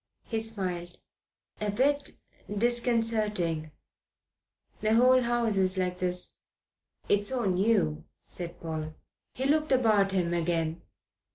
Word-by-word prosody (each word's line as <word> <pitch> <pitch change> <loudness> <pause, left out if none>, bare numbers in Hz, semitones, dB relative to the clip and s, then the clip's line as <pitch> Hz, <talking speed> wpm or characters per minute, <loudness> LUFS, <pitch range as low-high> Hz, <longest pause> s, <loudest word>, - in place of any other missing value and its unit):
He 225 - -3
smiled. 185 -6 -4 0.6
"A 210 - -1
bit 275 +7 +1 0.4
disconcerting." 215 -7 +1 1.1
"The 215 +1 +2
whole 255 +2 +5
house 235 -3 0
is 190 0 +2
like 180 -1 -1
this." 180 0 0 0.7
"It's 205 0 +3
so 255 -4 -1
new," 185 - +1 0.2
said 175 -1 -5
Paul. 155 -1 -5 0.4
He 260 - -2
looked 305 +2 +2
about 215 -6 +3
him 175 -2 0
again. 165 -1 -1
205 Hz, 110 wpm, -28 LUFS, 175-235 Hz, 1.1 s, whole